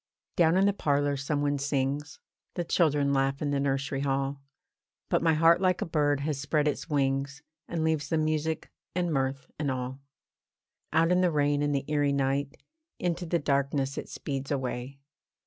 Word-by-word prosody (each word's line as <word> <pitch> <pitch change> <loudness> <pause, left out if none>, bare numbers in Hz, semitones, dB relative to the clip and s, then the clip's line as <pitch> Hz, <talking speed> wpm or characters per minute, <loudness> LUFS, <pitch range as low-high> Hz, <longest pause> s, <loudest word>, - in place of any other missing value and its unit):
Down 170 0 +4
in 195 - +4
the 200 - +3
parlour 145 -5 +1
some 145 +1 -1
one 145 -1 +1
sings; 140 +1 -1 0.4
The 175 - -1
children 145 -5 +2
laugh 135 0 +1
in 145 -1 -1
the 140 - +1
nursery 135 0 -1
hall; 135 0 -1 0.7
But - - +2
my 165 -1 +3
heart 165 +3 +5
like 185 -1 +2
a - - -1
bird 145 -3 +1
has 145 -1 -2
spread 150 +1 +1
its 150 - -2
wings, 140 0 0 0.2
And 165 -2 -2
leaves 155 -3 0
the 160 - +1
music, 155 0 -1 0.2
and 175 -2 0
mirth, 135 -1 -2
and 145 -2 0
all. 130 0 -3 0.9
Out 165 +1 +3
in 180 0 +4
the 180 - +4
rain 145 -2 +1
and 145 0 +1
the 140 - -1
eerie 145 -2 +1
night, 140 0 0 0.4
Into 175 0 -2
the 170 - +2
darkness 140 -2 0
it - - -6
speeds 135 -1 -4
away. 130 -1 -3
145 Hz, 180 wpm, -28 LUFS, 140-160 Hz, 0.9 s, heart